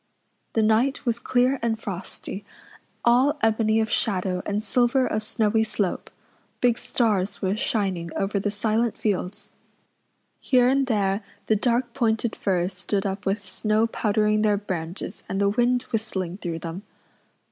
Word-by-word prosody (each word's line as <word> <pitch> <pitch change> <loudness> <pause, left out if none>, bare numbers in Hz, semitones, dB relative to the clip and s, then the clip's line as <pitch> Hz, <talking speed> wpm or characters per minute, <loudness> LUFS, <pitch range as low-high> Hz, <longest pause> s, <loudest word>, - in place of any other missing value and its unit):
The 225 - +2
night 230 +7 +2
was 235 -1 0
clear 255 +2 +2
and 225 -1 0
frosty, 195 0 -6 0.6
all 255 +5 +4
ebony 220 0 +3
of 220 -1 0
shadow 185 -3 0
and 210 +1 -1
silver 245 +4 +2
of 215 - -1
snowy 220 0 +1
slope; 205 -3 -2 0.5
big 245 -2 +3
stars 205 -4 0
were 190 +1 +1
shining 190 -6 -1
over 200 0 0
the 205 - -1
silent 220 +2 0
fields; 200 -2 -2 0.9
here 250 -2 +4
and 270 +1 +2
there 200 -3 +1 0.2
the 220 - +3
dark 240 +2 +1
pointed 225 -2 0
firs 185 -1 0
stood 190 +2 -2
up 195 0 -3
with 200 +1 0
snow 215 +4 +1
powdering 215 -1 +1
their 210 -1 +3
branches 180 -3 -5
and 195 - -1
the 200 0 +3
wind 245 +3 +2
whistling 190 -5 -2
through 170 -5 -4
them. 165 +3 -6
215 Hz, 145 wpm, -25 LUFS, 195-235 Hz, 0.9 s, all